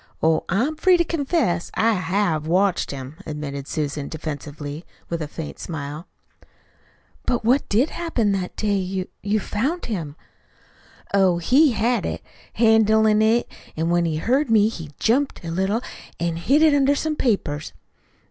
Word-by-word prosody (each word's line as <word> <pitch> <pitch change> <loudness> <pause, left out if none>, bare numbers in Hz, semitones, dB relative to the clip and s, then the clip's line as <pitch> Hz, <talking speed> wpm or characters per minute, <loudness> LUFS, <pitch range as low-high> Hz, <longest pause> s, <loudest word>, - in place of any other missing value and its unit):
Oh, 160 0 +3
I'm 260 - 0
free 365 +2 +5
to 340 - +3
confess 285 - 0
I 225 +1 +3
HAVE 180 -4 0
watched 185 +2 +2
him," 135 +2 -7
admitted 140 -2 -5
Susan 145 -2 -3
defensively, 150 0 -6 0.3
with 170 -1 -3
a 150 - -3
faint 155 +1 -7
smile. 150 +1 -6 1.2
"But 240 -3 0
what 260 +5 +2
did 240 +9 +2
happen 290 -12 0
that 190 -2 -2
day 205 -2 0
you 185 0 -3
you 210 +1 0
found 270 - -2
him?" 165 -10 -4 1.0
"Oh, 190 -3 +4
he 265 - +4
had 235 +3 +1
it, - - -5 0.3
handlin' 220 -1 +4
it, 225 +2 +3 0.3
an' 165 +2 0
when 175 0 +2
he 160 -2 -1
heard 260 - +1
me, 215 -1 +5
he 165 -8 -8
jumped 260 -3 0
a 165 - -4
little, 190 +7 0 0.4
an' 170 0 -1
hid 270 - +3
it 310 -2 +6
under 285 0 +3
some 310 +2 -1
papers. 175 - -1
200 Hz, 155 wpm, -22 LUFS, 160-240 Hz, 1.2 s, it